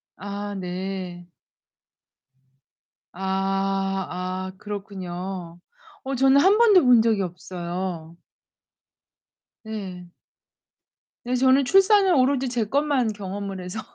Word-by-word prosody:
아 205 Hz, +1 st, -6 dB
네. 180 Hz, -1 st, -5 dB, 1.8 s
아. 195 Hz, 0 st, -1 dB
아 185 Hz, +1 st, -4 dB
그렇군요. 185 Hz, -3 st, -6 dB, 0.4 s
어 270 Hz, 0 st, -3 dB
저는 270 Hz, +2 st, +5 dB
1 395 Hz, +5 st, +5 dB
번도 420 Hz, -8 st, +6 dB
본 245 Hz, -3 st, +6 dB
적이 220 Hz, -3 st, +2 dB
없어요. 175 Hz, -2 st, -5 dB, 1.4 s
네. 190 Hz, -5 st, -7 dB, 1.1 s
네, 250 Hz, +1 st, 0 dB
저는 260 Hz, +2 st, +4 dB
출산은 390 Hz, -, +5 dB
오로지 260 Hz, 0 st, +2 dB
제 240 Hz, -3 st, -1 dB
것만 275 Hz, -3 st, +1 dB
경험을 195 Hz, -1 st, -6 dB
해서. 180 Hz, +5 st, -6 dB
195 Hz, 160 characters per minute, -24 LUFS, 185-250 Hz, 1.8 s, 번도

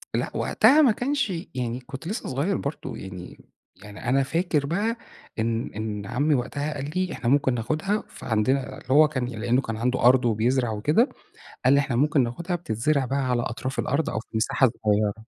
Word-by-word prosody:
لأ، -, -, -1 dB
وقتها 305 Hz, +3 st, +5 dB
ما 260 Hz, -6 st, +6 dB
كانش 250 Hz, -2 st, -1 dB, 0.2 s
يعني 125 Hz, 0 st, -2 dB
كنت 135 Hz, +5 st, -9 dB
لسه 215 Hz, -, -4 dB
صغير 150 Hz, +9 st, 0 dB
برضه 140 Hz, +3 st, -5 dB
يعني 90 Hz, -2 st, -9 dB, 0.4 s
يعني 105 Hz, +4 st, -7 dB
أنا 135 Hz, +1 st, +3 dB
فاكر 155 Hz, -1 st, 0 dB
بقى 210 Hz, +9 st, -1 dB, 0.4 s
إن 115 Hz, +1 st, -1 dB
إن 105 Hz, -2 st, -4 dB
عمي 145 Hz, +8 st, +1 dB
وقتها 140 Hz, +4 st, -2 dB
قال 145 Hz, 0 st, -5 dB
لي: 185 Hz, -1 st, 0 dB
"إحنا 120 Hz, -, -2 dB
ممكن 135 Hz, -2 st, +3 dB
ناخدها، 155 Hz, -, -1 dB
فعندنا" 125 Hz, +5 st, 0 dB, 0.2 s
اللي -, -, -15 dB
هو 155 Hz, +2 st, +7 dB
كان 130 Hz, -4 st, -2 dB
لأنه 120 Hz, +2 st, 0 dB
كان 110 Hz, -3 st, -4 dB
عنده 125 Hz, +3 st, 0 dB
أرض 125 Hz, 0 st, +6 dB
وبيزرع 120 Hz, +2 st, +1 dB
وكده، 150 Hz, -, +2 dB, 0.6 s
قال 130 Hz, -, +6 dB
لي: 140 Hz, -, +5 dB
"إحنا 135 Hz, -4 st, -1 dB
ممكن 145 Hz, 0 st, +3 dB
ناخدها، 170 Hz, +10 st, -3 dB
بتتزرع 140 Hz, -1 st, 0 dB
بقى 135 Hz, 0 st, -1 dB
على 120 Hz, -1 st, +1 dB
أطراف 130 Hz, +3 st, -4 dB
الأرض 140 Hz, +4 st, 0 dB
أو 110 Hz, -, -2 dB
في 115 Hz, -, -12 dB
مساحة 115 Hz, +3 st, +3 dB, 0.2 s
صغيرة." 105 Hz, -1 st, +2 dB
130 Hz, 185 wpm, -25 LUFS, 120-155 Hz, 0.6 s, هو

